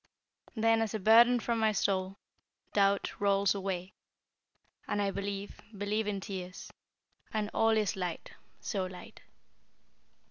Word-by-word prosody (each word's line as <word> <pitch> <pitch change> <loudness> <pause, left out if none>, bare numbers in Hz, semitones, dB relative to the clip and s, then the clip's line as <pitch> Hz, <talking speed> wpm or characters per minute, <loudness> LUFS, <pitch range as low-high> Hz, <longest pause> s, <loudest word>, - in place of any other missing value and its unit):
"Then, 225 0 +3
as 220 -1 -1
a - - -2
burden 235 +4 +6
from 235 0 -1
my 220 -1 +3
soul, 190 0 0 0.6
Doubt 200 -1 +2
rolls 200 -1 +3
away, 190 -2 -4 0.9
And 205 - -1
I 200 -1 +1
believe 200 0 -5 0.2
believe 210 +2 -1
in 200 -1 -1
tears, 185 -2 -7 0.6
And 215 -1 -2
all 225 0 +3
is 210 -3 0
light 180 -3 -4 0.3
so 190 -4 -2
light!" 185 -1 -11
200 Hz, 130 wpm, -31 LUFS, 190-220 Hz, 0.9 s, burden